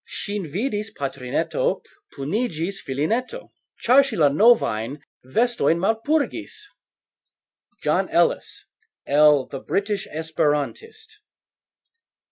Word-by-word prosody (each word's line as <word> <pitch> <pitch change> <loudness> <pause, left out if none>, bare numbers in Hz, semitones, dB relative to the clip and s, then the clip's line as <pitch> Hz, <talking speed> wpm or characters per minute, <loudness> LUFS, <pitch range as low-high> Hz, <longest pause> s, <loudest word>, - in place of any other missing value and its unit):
Sxin 200 -7 -4
vidis 210 - -2
patrineto, 140 - -2 0.3
Punigxis 180 - -3
filineto, 225 - -2 0.3
Cxar 255 +4 +7
sxi 270 -6 -3
la 150 -3 +5
novajn 145 - +3 0.2
vestojn 165 - +1
malpurigis. 285 - -1 1.2
JOHN - - +1
ELLIS, - - 0 0.4
el 145 -1 +5
"The 135 - -7
British 200 +4 -2
Esperantist". 160 - -3
195 Hz, 85 wpm, -23 LUFS, 145-245 Hz, 1.2 s, Cxar